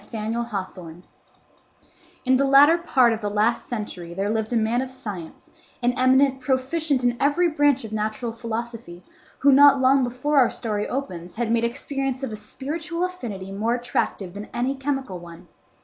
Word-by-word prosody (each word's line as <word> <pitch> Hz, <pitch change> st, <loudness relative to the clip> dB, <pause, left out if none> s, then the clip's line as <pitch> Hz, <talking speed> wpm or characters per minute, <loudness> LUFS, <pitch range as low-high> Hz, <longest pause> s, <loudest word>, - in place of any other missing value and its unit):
THE 230 Hz, -, -6 dB
BIRTHMARK 200 Hz, -6 st, -5 dB, 1.2 s
In 260 Hz, 0 st, +4 dB
the 275 Hz, -, +2 dB
latter 285 Hz, +5 st, +6 dB
part 255 Hz, -8 st, +3 dB
of 225 Hz, -, -5 dB
the 205 Hz, -, -2 dB
last 215 Hz, +3 st, 0 dB
century 185 Hz, -7 st, -6 dB
there 200 Hz, +2 st, -1 dB
lived 220 Hz, 0 st, -2 dB
a -, -, 0 dB
man 225 Hz, +3 st, +1 dB
of 260 Hz, -, -4 dB
science, 205 Hz, -11 st, -9 dB, 0.3 s
an 245 Hz, +1 st, +3 dB
eminent 265 Hz, +1 st, +3 dB
proficient 265 Hz, +2 st, 0 dB
in 245 Hz, -1 st, +2 dB
every 295 Hz, +5 st, +3 dB
branch 290 Hz, -4 st, +2 dB
of 220 Hz, -, -8 dB
natural 215 Hz, +2 st, -2 dB
philosophy, 230 Hz, -5 st, -6 dB, 0.3 s
who 280 Hz, -, +4 dB
not 280 Hz, 0 st, +7 dB
long 265 Hz, +1 st, +4 dB
before 255 Hz, +4 st, +1 dB
our 250 Hz, -, +5 dB
story 210 Hz, -3 st, -2 dB
opens 180 Hz, -10 st, -5 dB
had 230 Hz, -1 st, -1 dB
made 230 Hz, 0 st, +2 dB
experience 270 Hz, +1 st, -3 dB
of 265 Hz, -, -3 dB
a -, -, -4 dB
spiritual 315 Hz, +10 st, -4 dB
affinity 220 Hz, -, -6 dB
more 220 Hz, +4 st, 0 dB
attractive 240 Hz, -6 st, -2 dB
than 205 Hz, +1 st, -8 dB
any 250 Hz, +3 st, 0 dB
chemical 270 Hz, -8 st, -3 dB
one. 170 Hz, -1 st, -12 dB
240 Hz, 170 wpm, -23 LUFS, 215-270 Hz, 1.2 s, not